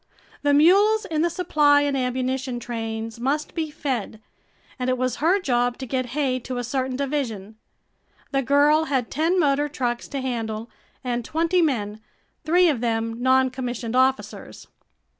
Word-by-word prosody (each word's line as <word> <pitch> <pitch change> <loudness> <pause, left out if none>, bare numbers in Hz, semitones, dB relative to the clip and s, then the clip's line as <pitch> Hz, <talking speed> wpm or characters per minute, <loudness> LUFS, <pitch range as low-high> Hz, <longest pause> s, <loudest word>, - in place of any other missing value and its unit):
The 285 -1 +3
mules 405 +8 +5
in 315 -5 -1
the 340 - +2
supply 300 -5 +3
and 285 -1 0
ammunition 255 0 -2
trains 225 -1 -5
must 285 +5 -1
be 320 -2 -2
fed 260 -8 -4 0.6
and 250 0 -1
it 255 - +1
was 255 0 -1
her 350 +6 +3
job 245 -7 0
to 265 - -6
get 255 0 -2
hay 260 -3 +1
to 255 +1 -6
a 245 - -2
certain 260 +1 -2
division. 250 -7 -3 0.7
The 275 -1 +1
girl 290 +4 +3
had 260 -6 -1
ten 330 +4 +1
motor 290 -2 +2
trucks 245 -4 -3
to 280 - -4
handle 230 -3 -4 0.3
and 245 -1 -2
twenty 330 +6 +1
men, 215 -9 -1 0.4
three 355 +3 +4
of 280 -8 0
them 230 0 -2
noncommissioned 255 -2 0
officers. 260 +1 -1
260 Hz, 155 wpm, -23 LUFS, 240-295 Hz, 0.7 s, mules